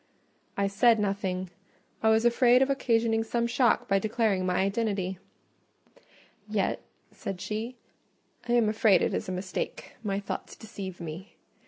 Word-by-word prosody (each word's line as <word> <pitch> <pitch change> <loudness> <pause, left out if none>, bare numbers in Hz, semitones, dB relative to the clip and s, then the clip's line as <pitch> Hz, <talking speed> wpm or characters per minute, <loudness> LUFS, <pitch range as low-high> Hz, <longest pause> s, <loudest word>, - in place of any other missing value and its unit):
I 200 - +2
said 225 +3 +4
nothing: 190 -3 -2 0.5
I 220 - +3
was 220 +1 +3
afraid 245 +1 +5
of 270 - 0
occasioning 225 -4 +1
some 235 +1 -1
shock 240 0 +2
by 195 0 +3
declaring 210 -3 0
my 180 - +1
identity. 195 -2 -1 1.3
"Yet," - - 0 0.3
said 195 -2 -6
she, 220 +6 -4 0.7
"I - - +3
am 235 -2 +4
afraid 215 -2 +4
it - - 0
is - - -2
a - - -2
mistake: 185 +1 -4
my 200 -2 -1
thoughts 200 - -6
deceive 200 -5 -8
me. 170 +4 -8
210 Hz, 145 wpm, -28 LUFS, 195-230 Hz, 1.3 s, afraid